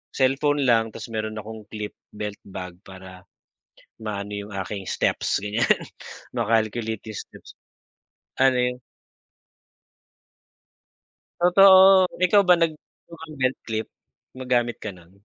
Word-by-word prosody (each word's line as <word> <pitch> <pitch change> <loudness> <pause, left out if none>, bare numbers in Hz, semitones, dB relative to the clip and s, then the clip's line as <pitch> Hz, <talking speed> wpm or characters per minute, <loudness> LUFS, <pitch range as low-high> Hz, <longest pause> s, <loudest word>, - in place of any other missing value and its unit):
cellphone 140 +2 +2
lang 115 -3 +2
tapos - - -8
mayro'n 110 -1 -3
akong 110 0 -9
clip 105 -1 -6 0.2
belt 105 -1 -5
bag 90 -2 -8
para 95 -1 -12 0.8
maano 105 -1 -5
'yong 100 +1 -7
aking 100 -1 -6
steps - - 0
ganyan 105 +3 -2 0.7
ma-calculate 110 -1 -1
'yong 105 - -5
steps. - - -15 0.9
Ano 130 -1 +4
'yon? 125 0 0 2.6
Totoo, 190 +1 +7 0.2
ikaw 200 +3 +5
ba 180 - +8
nag 165 -1 +2 0.4
mukang 160 -2 -11
belt 130 0 +1
clip? 110 -1 -3 0.4
Gumagamit 125 -2 -1
ka 105 - -4
'non? 90 -1 -18
115 Hz, 115 wpm, -24 LUFS, 105-135 Hz, 2.6 s, ba